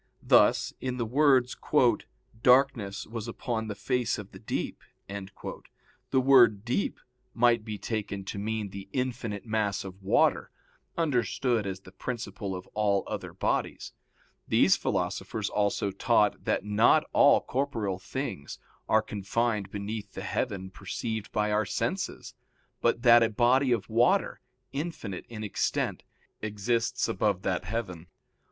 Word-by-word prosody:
Thus - - +4
in 125 -1 -2
the 120 - -1
words, 130 0 +3 0.9
"Darkness 125 -6 +3
was 115 0 -6
upon 115 -1 -3
the 105 - -4
face 125 +3 0
of 105 -2 -9
the - - -12
deep," - - -4 0.3
the 100 +6 -6
word 120 -6 +5
"deep" 125 +11 -1 0.4
might 120 -1 +4
be 110 -1 -5
taken 100 -3 -4
to 100 - -5
mean 110 -1 -3
the 100 0 -9
infinite 125 -5 -3
mass 110 -3 -1
of 95 0 -10
water, 95 - +2 0.5
understood 125 - +1
as 95 0 -5
the - - -14
principle 100 -5 -5
of 90 - -7
all 100 -2 +2
other - - -5
bodies. - - -2 0.5
These - - +5
philosophers 110 -2 -2
also 100 -1 0
taught 105 +1 +2
that - - 0
not 110 +9 +4
all 145 - +6
corporeal 115 -9 -2
things 100 - -5 0.3
are - - +4
confined 105 0 -1
beneath 105 +1 -5
the - - -6
heaven 95 -2 -3
perceived 110 +3 -5
by 105 0 0
our 105 -1 +1
senses, - - -3 0.5
but 120 0 +1
that 120 -1 +8
a 115 - +3
body 125 +4 +3
of 115 -5 0
water, 120 - +2 0.3
infinite 140 - -5
in 110 -2 -6
extent, 105 - -1 0.4
exists 115 +3 0
above 105 -4 0
that 95 0 -1
heaven. 90 -5 -4
110 Hz, 135 wpm, -28 LUFS, 100-120 Hz, 0.9 s, that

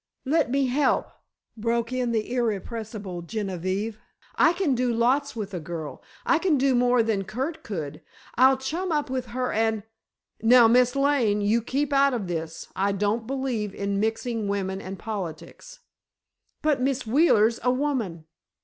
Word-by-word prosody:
"Let 300 -1 +2
me 275 +2 +2
help," 260 +2 +1 0.4
broke 230 +2 -1
in 250 -2 0
the 225 +1 -1
irrepressible 215 -4 -3
Genevieve. 195 +2 -3 0.4
"I - - +5
can 350 -6 +1
do 250 0 +1
lots 260 +5 +1
with 205 -3 -5
a 180 - -3
girl. 160 -1 -6 0.2
I 335 - +3
can 335 -5 +2
do 270 0 +3
more 245 -1 +3
than 215 -3 0
Curt 270 - -4
could. 160 - -6 0.3
I'll 260 +2 +5
chum 330 +8 -3
up 295 -4 -1
with 255 -1 -2
her 250 +1 -2
and——" 220 -1 0 0.6
"Now, 235 +1 +7
Miss 250 +2 +4
Lane, 275 -7 +2
you 215 +3 +2
keep 280 +5 -1
out 275 -1 +4
of 220 -5 -3
this. 165 -1 -5
I 200 +1 +1
don't 210 +3 -1
believe 250 -7 -2
in 200 0 -1
mixing 225 0 -1
women 195 -1 -2
and 190 0 -7
politics." 210 - -7 0.8
"But 300 -4 +2
Miss 260 -1 0
Wheeler's 230 -3 +4
a 250 - +1
woman." 250 - -1
235 Hz, 160 wpm, -25 LUFS, 205-265 Hz, 0.8 s, Now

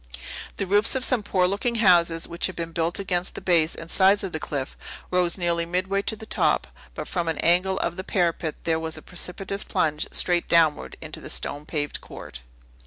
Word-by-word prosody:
The 195 - -1
roofs 205 +5 +4
of 260 -1 +3
some 255 -4 +2
poor 190 -3 +1
looking 205 +6 0
houses, 170 -6 +4
which 170 +1 -1
had 185 - -8
been 165 -1 -4
built 165 +1 0
against 185 -2 -1
the - - -4
base 165 -3 +2
and 165 - -8
sides 195 +1 +4
of 190 - -3
the 155 - -4
cliff, 140 -3 -4 0.4
rose 180 -1 +2
nearly 170 -2 +1
midway 185 +3 -1
to 220 - -2
the 220 - -10
top; - - +1 0.3
but - - -5
from 175 -2 -2
an 165 - -1
angle 185 +3 +3
of 175 -1 -2
the 185 - -4
parapet 170 -4 0
there 160 -1 +1
was 160 0 -3
a - - -11
precipitous 190 +2 -2
plunge 155 -6 0
straight 175 -1 +1
downward 160 -3 +3
into - - -7
a - - -7
stonepaved 145 0 -3
court. - - -10
175 Hz, 200 wpm, -25 LUFS, 165-195 Hz, 0.4 s, roofs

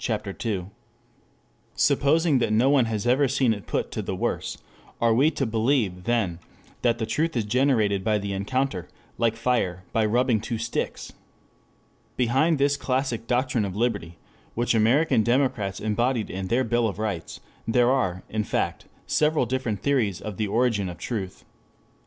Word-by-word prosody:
II.] 100 -6 -1 1.1
Supposing 155 0 +3
that 115 - 0
no 120 +6 +4
one 135 -4 +4
has 110 -2 -3
ever 130 +3 +3
seen 130 -3 +2
it 100 -2 -9
put - - -2
to - - -3
the - - -4
worse, - - -2 0.4
are 115 -1 +3
we 135 +7 +4
to 140 -3 -2
believe 110 -5 0
then 110 -8 0 0.4
that 120 -1 +2
the 115 - -2
truth 160 +4 -1
is 110 - 0
generated 110 -5 +2
by 110 -1 +2
the 100 -1 -3
encounter, 100 -1 -2 0.3
like 115 -1 +2
fire 115 -7 0
by 115 - +2
rubbing 115 0 +2
two 115 +1 -3
sticks? 115 +1 -4 1.0
Behind 135 +7 +2
this 140 +1 +2
classic 130 -4 -2
doctrine 125 -2 +1
of 95 -2 -4
liberty, 100 -7 -1 0.4
which 120 +1 +1
American 115 +5 +3
democrats 120 -5 0
embodied 115 +2 0
in 95 +1 -4
their 120 +6 +2
Bill 120 -1 +1
of 100 - -4
Rights, 110 -2 -4 0.3
there 120 +2 +3
are, 95 -9 0
in 110 0 -2
fact, - - -2 0.2
several 150 -3 +2
different 120 -4 -2
theories 120 -10 +1
of 105 -3 -7
the 105 - -1
origin 110 -3 +1
of 85 - -8
truth. 95 0 -5
115 Hz, 160 wpm, -25 LUFS, 105-130 Hz, 1.1 s, no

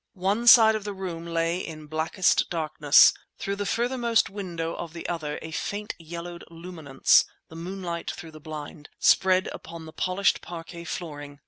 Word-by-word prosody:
One 200 +6 0
side 225 -2 +9
of 215 -1 -3
the 205 -1 -5
room 170 -3 -6
lay 165 +1 0
in 155 -4 -7
blackest 160 +4 +1
darkness; 155 -3 +5 0.2
through 200 0 -3
the 205 0 -3
furthermost 235 -2 +1
window 175 -5 -4
of 170 -2 -7
the 170 - -6
other 155 -4 -3
a 160 - -7
faint 205 +6 -4
yellowed 170 +1 -8
luminance 165 -5 +2 0.3
(the 160 - -12
moonlight 175 0 -5
through 160 - -7
the 155 - -12
blind) 150 -1 -8
spread 185 0 +4
upon 165 0 -9
the 160 - -11
polished 185 +2 +1
parquet 170 0 -8
flooring. 145 -4 -7
170 Hz, 160 wpm, -26 LUFS, 160-190 Hz, 0.3 s, side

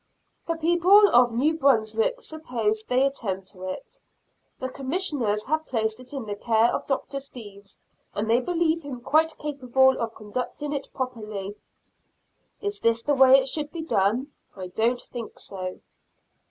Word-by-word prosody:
The 330 - 0
people 345 +5 +5
of 245 0 +5
New 285 +8 +1
Brunswick 225 - +2
suppose 235 -9 -2
they 255 +2 +3
attend 195 -9 -2
to 185 -2 -10
it. - - -8 0.6
The 260 - -3
Commissioners 270 - -1
have 315 +3 -1
placed 220 -2 -1
it 255 0 -11
in 270 -5 -5
the 205 - -4
care 225 +2 +2
of - - -3
Dr. 275 0 -2
Steeves, 205 -7 -11 0.4
and 210 +1 -1
they 230 +2 +4
believe 330 +2 0
him 275 -5 -7
quite 315 +5 +2
capable 265 -3 +2
of 230 -1 -3
conducting 250 +7 -4
it 280 -1 -5
properly. 215 -6 -5 1.1
Is 410 0 -2
this 230 0 +2
the 295 - +1
way 265 -1 +7
it 265 - -3
should 295 +2 -3
be 330 -2 -5
done? 240 +1 +1 0.2
I 185 -2 -7
don't 230 +6 +1
think 240 -2 -8
so. 185 -2 -6
255 Hz, 155 wpm, -25 LUFS, 220-295 Hz, 1.1 s, way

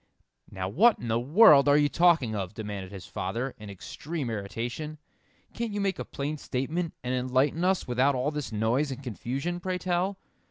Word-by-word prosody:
"Now 95 -2 -4
what 210 - +4
in 120 - -6
the 115 +1 +2
world 145 - +6
are 145 - +6
you 145 -1 +4
talking 165 -8 +3
of?" 100 0 -4
demanded 100 -3 -6
his 95 -3 -9
father, 115 +8 -3
in 105 -1 -9
extreme 140 - -5
irritation. 120 +9 -4 0.6
"Can't 230 -2 -3
you 205 - -2
make 195 -2 -1
a - - -4
plain 145 +2 -4
statement, 160 +8 -3
and 125 +1 -2
enlighten 130 +6 +1
us 190 0 +1
without 130 +3 +2
all 130 +4 0
this 150 -5 -4
noise 115 +7 +1
and 135 +1 -6
confusion, 135 - -3
pray 185 +1 -2
tell?" 180 +2 -1
135 Hz, 185 wpm, -28 LUFS, 115-170 Hz, 0.6 s, world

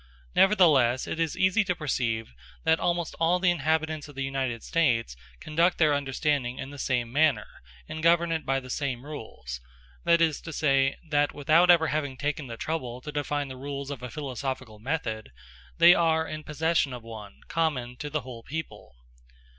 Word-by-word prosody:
Nevertheless 150 - +5
it - - -4
is 165 -2 -1
easy 185 +4 +3
to 180 -2 -1
perceive 115 - -2 0.3
that 160 0 +3
almost 175 -2 -1
all 165 +2 +3
the 180 0 +3
inhabitants 160 -1 -1
of 145 - -13
the 135 - -3
United 135 -4 -2
States 120 - +1 0.2
conduct 165 +3 +1
their 155 -3 +4
understanding 140 -2 -1
in 135 - -6
the 145 - -10
same 125 -3 -1
manner, 145 -6 +3 0.4
and 160 - -6
govern 170 +1 +4
it 160 -1 -1
by 135 0 0
the 130 -1 -9
same 130 -2 -3
rules; 110 - -8 0.4
that 170 0 +4
is 160 -3 +2
to 165 - -7
say, 135 -3 +2
that 145 -1 +1
without 160 +5 +4
ever 165 -2 +6
having 145 -4 -2
taken 145 +1 -2
the 115 -1 -7
trouble 125 -6 -3
to 150 - -7
define 145 -1 -2
the 130 - -8
rules 140 +1 -5
of 135 -4 -6
a 125 - -6
philosophical 130 -4 -5
method, 110 - -3 0.5
they 175 - +8
are 160 -2 +2
in 155 +1 -6
possession 150 -2 0
of 120 -2 -7
one, 110 -3 -10
common 135 -7 -1
to 150 - -5
the 150 0 -2
whole 125 -3 -9
people. 150 - -7
145 Hz, 180 wpm, -27 LUFS, 130-160 Hz, 0.5 s, they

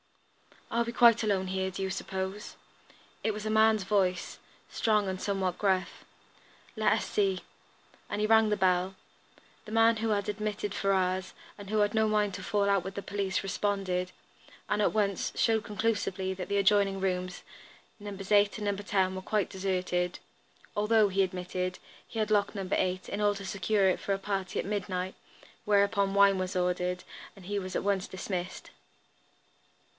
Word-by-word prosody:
"Are 235 +1 +2
we 235 - -3
quite 235 -1 +6
alone 200 -4 0
here, 190 0 -1
do 190 +1 -5
you 190 - -2
suppose?" 190 +2 -4 0.7
It 220 - +3
was 210 0 -6
a - - -1
man's 220 -1 +4
voice, 185 -3 0 0.3
strong 215 -3 +1
and 185 0 -4
somewhat 190 -3 -1
gruff. 190 -2 0 0.7
"Let 215 - +3
us - - -1
see." 195 -3 0 0.7
And 205 - -2
he - - +3
rang 220 0 +5
the 210 - +1
bell. 185 0 +2 0.7
The 215 - -9
man 225 0 +5
who 225 +1 -1
had 200 -2 0
admitted 210 -1 -3
Ferrars, 190 -2 0 0.2
and 200 -2 -10
who 215 0 +1
had 205 0 +2
no 220 -1 +3
mind 210 -2 +1
to 200 - -6
fall 200 +1 0
out 195 -3 +2
with 190 - -6
the 200 - -4
police, 200 -1 -2
responded, 195 -2 -1 0.6
and 210 - +1
at - - +2
once 200 -3 0
showed 220 -2 +2
conclusively 205 -3 -1
that 185 -1 -6
the 200 - 0
adjoining 200 -1 +3
rooms, 185 -1 -2 0.6
Nos. 200 -1 -7
8 205 0 +4
and 205 -1 -3
10, 190 -2 +2
were 185 - -4
quite 205 +1 0
deserted, 180 -2 -1 0.6
although, 210 0 +3
he 195 +1 +1
admitted, 180 0 -2 0.3
he - - -9
had 215 -1 0
locked 205 0 +2
No. 195 -2 -4
8 185 0 0
in 205 - -3
order 205 -1 +2
to 200 - -7
secure 200 0 +1
it 185 - 0
for 200 - -1
a - - 0
party 195 -1 -3
at - - -1
midnight; 190 -2 -2 0.5
whereupon 200 -1 +2
wine 200 -1 +5
was 185 0 -3
ordered 180 0 0 0.3
and 195 -3 -14
he 205 +2 -2
was 185 -1 -6
at - - 0
once 195 -1 0
dismissed. 185 -1 -5
200 Hz, 175 wpm, -30 LUFS, 185-210 Hz, 0.7 s, quite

